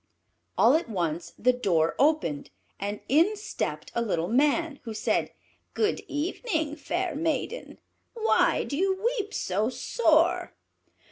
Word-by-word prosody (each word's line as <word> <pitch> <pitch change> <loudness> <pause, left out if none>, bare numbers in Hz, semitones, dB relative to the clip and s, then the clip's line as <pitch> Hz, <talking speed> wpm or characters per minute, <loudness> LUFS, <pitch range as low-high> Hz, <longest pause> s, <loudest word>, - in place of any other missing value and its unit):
All - - +6
at 320 -6 +1
once 170 -4 -2
the 250 +2 +3
door 170 -10 +1
opened, 280 - +1 0.3
and 205 +1 -4
in 335 - +4
stepped 430 +2 -4
a 235 - 0
little 175 -7 -1
Man, 290 +4 +2
who 225 -5 -7
said, - - 0 0.4
"Good 430 -1 +1
evening, 315 0 -2
fair 345 +2 -2
maiden; 320 - -2 0.4
why 450 -1 +2
do 280 - -4
you 380 +3 +1
weep 430 -1 -1
so 205 - -1
sore?" 350 - +2
300 Hz, 130 wpm, -27 LUFS, 220-360 Hz, 0.4 s, All